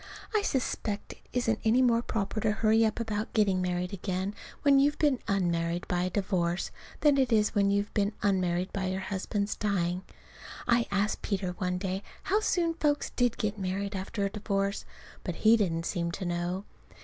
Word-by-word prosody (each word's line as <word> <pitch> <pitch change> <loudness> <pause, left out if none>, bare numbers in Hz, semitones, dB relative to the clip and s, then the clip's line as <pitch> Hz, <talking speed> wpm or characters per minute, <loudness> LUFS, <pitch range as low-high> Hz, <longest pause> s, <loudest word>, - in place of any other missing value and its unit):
I 430 - +3
suspect 225 - -2
it - - -22
isn't 230 -3 +1
any 235 +4 +4
more 235 -2 +4
proper 220 -2 -2
to 215 0 +2
hurry 220 +1 +3
up 220 0 +1
about 220 -1 -2
getting 195 -4 +3
married 180 +1 -1
again 190 +1 -2 0.3
when 280 -1 +6
you've 290 +2 +3
been 285 -5 +2
_un_married 175 -3 0
by 175 0 0
a - - 0
divorce 185 -3 0 0.3
than 290 -2 +5
it 260 -2 +2
is 215 -2 +3
when 200 -2 +3
you've 200 +1 0
been 205 0 +1
unmarried 185 -2 +1
by 190 -1 -1
your 190 +1 -1
husband's 200 +1 -2
dying. 180 -3 0 0.7
I 235 0 +3
asked 200 +1 0
Peter 190 -3 -1
one 180 0 -2
day 190 0 -2 0.2
how 410 +3 +2
soon 345 -6 +1
folks 295 -3 0
did 245 -2 +1
get 210 -1 -2
married 195 +2 -2
after 195 +2 -2
a 200 - -2
divorce, 200 -1 -1 0.4
but 180 - -3
he 220 +5 +5
didn't 170 -6 0
seem 170 -1 -1
to 190 - -4
know. 175 +3 -2
200 Hz, 185 wpm, -29 LUFS, 185-225 Hz, 0.7 s, when